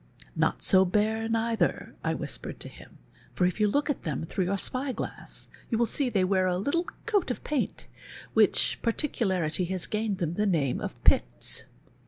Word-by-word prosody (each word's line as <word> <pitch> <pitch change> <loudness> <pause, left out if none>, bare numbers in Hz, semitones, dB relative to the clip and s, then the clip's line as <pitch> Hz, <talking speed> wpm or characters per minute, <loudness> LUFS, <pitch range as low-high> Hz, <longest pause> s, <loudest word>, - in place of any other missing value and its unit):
"Not - - +1
so 190 0 +6
bare, 215 +4 +1
neither," 225 0 0
I - - 0
whispered - - -5
to - - 0
him, - - -14 0.4
"for 180 - +3
if 180 +4 0
you 210 - +4
look 285 +8 +1
at 290 - -1
them 155 -1 -3
through 185 +3 -1
your 195 +2 0
spy 260 +7 +1
glass - - -6 0.2
you 225 - +1
will 235 - +3
see 265 +3 +1
they 200 -5 +2
wear 185 0 +2
a 180 -1 +1
little 285 - 0 0.2
coat 415 -7 +1
of 250 - -3
paint, 295 -3 -2 0.5
which - - +4
particularity 190 - 0
has 185 0 +1
gained 215 -2 -1
them 170 -4 -1
the 210 +3 +1
name 150 -9 +1
of - - -4
Piets." - - +2
210 Hz, 185 wpm, -28 LUFS, 185-235 Hz, 0.5 s, so